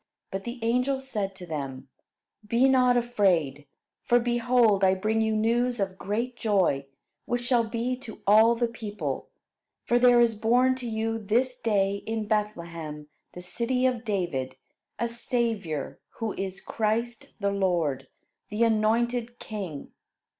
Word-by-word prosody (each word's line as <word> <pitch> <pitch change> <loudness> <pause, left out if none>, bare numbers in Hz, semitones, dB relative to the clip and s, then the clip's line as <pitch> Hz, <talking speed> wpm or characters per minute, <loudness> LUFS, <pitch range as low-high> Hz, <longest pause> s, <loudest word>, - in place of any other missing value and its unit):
But 195 0 -4
the 240 +2 -5
angel 250 +4 +1
said 210 -8 -3
to 185 -2 -9
them: 135 -4 -5 0.5
"Be 235 +5 +3
not 250 -2 +4
afraid; 180 - +1 0.3
for 240 - +3
behold 240 -3 +3
I 190 0 +5
bring 215 +4 0
you 220 0 +1
news 235 +2 +1
of 190 -1 -2
great 230 +5 -2
joy, 185 -12 +1 0.4
which 245 0 -2
shall 240 -2 +3
be 235 +2 -1
to 250 -4 -9
all 220 +3 +6
the 240 0 +1
people; 220 -3 -5 0.6
for 240 - +3
there 245 -1 +6
is 235 -1 +4
born 245 +4 +3
to 245 -2 -5
you 225 0 -1
this 240 +5 +1
day 200 -3 +1
in 220 -1 -2
Bethlehem, 170 -8 -3 0.2
the 180 - -8
city 235 +8 0
of 250 -2 +1
David, 175 - -2 0.4
a 235 - 0
Saviour 230 - -2 0.2
who 225 -2 -2
is 195 0 -5
Christ 230 +2 -2
the 200 -1 0
Lord, 170 -9 0 0.4
the 210 +3 +1
anointed 230 +2 +1
king. 190 - -6
220 Hz, 145 wpm, -27 LUFS, 195-240 Hz, 0.6 s, all